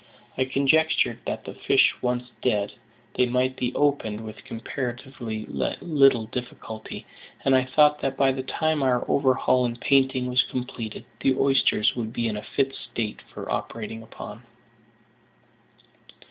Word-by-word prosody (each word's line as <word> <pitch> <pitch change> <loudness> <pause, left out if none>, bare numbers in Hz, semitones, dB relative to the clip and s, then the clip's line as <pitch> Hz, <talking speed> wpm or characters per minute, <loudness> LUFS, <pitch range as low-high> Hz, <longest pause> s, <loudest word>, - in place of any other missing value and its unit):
I 130 - +1
conjectured 135 -2 +2
that, - - -3
the - - -6
fish - - +4
once 125 0 -1
dead, 105 -5 +1 0.4
they 125 - +2
might 125 +1 +1
be 125 -1 -1
opened 140 -7 +1
with 110 -1 -9
comparatively 120 -2 -5
little 135 -8 +2
difficulty; 110 -1 -7 0.4
and 135 - +5
I 130 0 +3
thought 150 +3 +4
that 135 0 -1
by 135 -1 +4
the 130 0 -3
time 155 +3 0
our 125 -2 +2
overhaul 130 -2 +3
and 120 -1 -2
painting 135 -1 +3
was 125 0 +3
completed, 120 -4 -5
the 135 - +2
oysters 135 -5 +3
would 115 -2 -4
be 115 - -1
in 110 - -2
a 105 - -4
fit 135 +4 -1
state 110 -5 -5
for - - -7
operating 115 0 -4
upon. 115 0 -9
125 Hz, 145 wpm, -25 LUFS, 115-135 Hz, 0.4 s, and